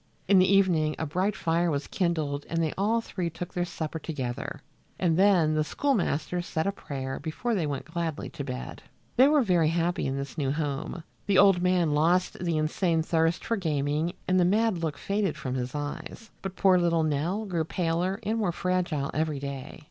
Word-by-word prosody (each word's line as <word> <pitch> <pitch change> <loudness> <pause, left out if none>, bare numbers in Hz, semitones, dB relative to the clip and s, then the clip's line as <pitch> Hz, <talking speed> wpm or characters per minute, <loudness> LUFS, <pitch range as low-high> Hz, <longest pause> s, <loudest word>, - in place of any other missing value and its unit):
In 195 0 +6
the 185 +1 +4
evening 175 -6 +3
a 160 - -2
bright 185 +7 0
fire 170 -2 +1
was 145 -2 -1
kindled 155 -6 -1
and 165 - -2
they 155 - -1
all 220 +4 +1
three 185 -6 -3
took 170 +1 -7
their 175 -1 0
supper 160 -2 -4
together, 140 -2 -5 0.3
and 170 -3 +2
then 180 -4 +4
the 155 0 +2
schoolmaster 180 - 0
said 160 -2 -2
a 200 - +1
prayer 135 -8 -5
before 160 - -2
they 175 -8 0
went 140 -2 -3
gladly 165 -2 -3
to - - -5
bed. 60 0 -6 0.3
They 260 +2 +7
were 295 -2 +4
very 175 -6 +3
happy 170 +1 0
in 135 +1 -2
this 140 +3 -5
new 135 -2 +1
home. 150 +2 -3 0.2
The 200 -2 +3
old 195 -2 +6
man 180 -3 +2
lost 175 +4 +2
the 170 -2 0
insane 160 +2 +1
thirst 165 0 +1
for 230 - 0
gaming 155 -1 0
and 185 0 +3
the - - +5
mad 210 +1 +2
look 160 -3 -2
faded 200 -1 -1
from 135 -4 -4
his 125 +1 -3
eyes, 145 +9 -6
but 190 -1 -5
poor 185 -2 +4
little 170 -2 +2
Nell 160 +8 -1
grew 175 -5 -1
paler 175 +4 -1
and 220 +2 -1
more 200 -5 +1
fragile 175 -5 -1
every 155 -1 0
day. 140 0 -6
170 Hz, 195 wpm, -27 LUFS, 150-185 Hz, 0.3 s, They